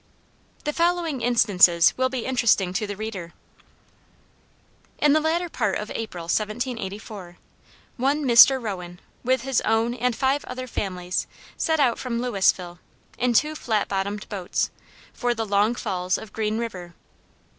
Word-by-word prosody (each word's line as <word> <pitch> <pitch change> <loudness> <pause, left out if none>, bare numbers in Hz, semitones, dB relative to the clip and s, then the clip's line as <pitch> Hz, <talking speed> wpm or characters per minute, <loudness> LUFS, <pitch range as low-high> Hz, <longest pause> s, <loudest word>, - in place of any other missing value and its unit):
The 300 - -2
following 335 -5 0
instances 200 -8 +4
will 260 0 +1
be 255 -3 -4
interesting 235 -8 +2
to 210 +2 -1
the 205 - -5
reader: 195 -5 -6 1.6
In 295 -1 +4
the 310 - +4
latter 330 +3 0
part - - -1
of 210 +1 -6
April, 210 -7 -5
1784, 210 -2 -4 0.6
one 280 +4 +1
Mr. 260 +2 +8
Rowan, 180 -6 -6 0.2
with 255 0 +1
his 265 -2 +1
own 225 +2 +1
and 250 0 -1
five 270 +3 +1
other 255 0 -6
families, 185 -6 -3 0.3
set 320 -1 0
out 250 -5 +2
from 240 -2 -3
Louisville, 190 -7 0 0.4
in 250 0 +2
two 300 +6 +3
flat 220 -8 -1
bottomed 200 +1 -3
boats, 190 -4 -2 0.4
for 245 -1 -1
the 225 0 -2
Long 205 +3 +2
Falls 185 -5 -1
of 215 - -11
Green 215 0 -1
River. 180 -7 -6
225 Hz, 145 wpm, -24 LUFS, 195-255 Hz, 1.6 s, Mr